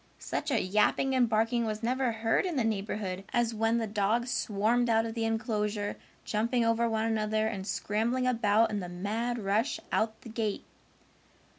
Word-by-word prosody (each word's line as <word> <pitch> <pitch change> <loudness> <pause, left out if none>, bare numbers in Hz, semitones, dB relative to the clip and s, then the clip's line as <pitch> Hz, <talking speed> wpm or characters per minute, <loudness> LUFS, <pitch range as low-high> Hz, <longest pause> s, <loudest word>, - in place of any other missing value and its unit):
Such - - -3
a 255 -5 +2
yapping 210 +7 +2
and 250 -3 +3
barking 225 +2 +2
was 215 0 -3
never 255 +1 +1
heard 225 0 +1
in 360 -4 -2
the 255 - +1
neighborhood 200 -3 -2
as 240 -1 +1
when 225 +1 +1
the 230 - 0
dogs 220 +4 0
swarmed 225 +4 +1
out 225 0 +3
of 225 - -4
the 225 -1 -1
enclosure, 210 -2 -1 0.3
jumping 230 +3 +1
over 230 +1 +2
one 220 0 0
another 215 -1 0
and 200 -3 -3
scrambling 230 +6 0
about 225 -2 +3
in 210 - -1
the 180 -2 -5
mad 215 +7 -2
rush 220 +8 0
out 220 0 0
the 235 - -10
gate. 220 -2 -2
225 Hz, 175 wpm, -30 LUFS, 210-235 Hz, 0.3 s, and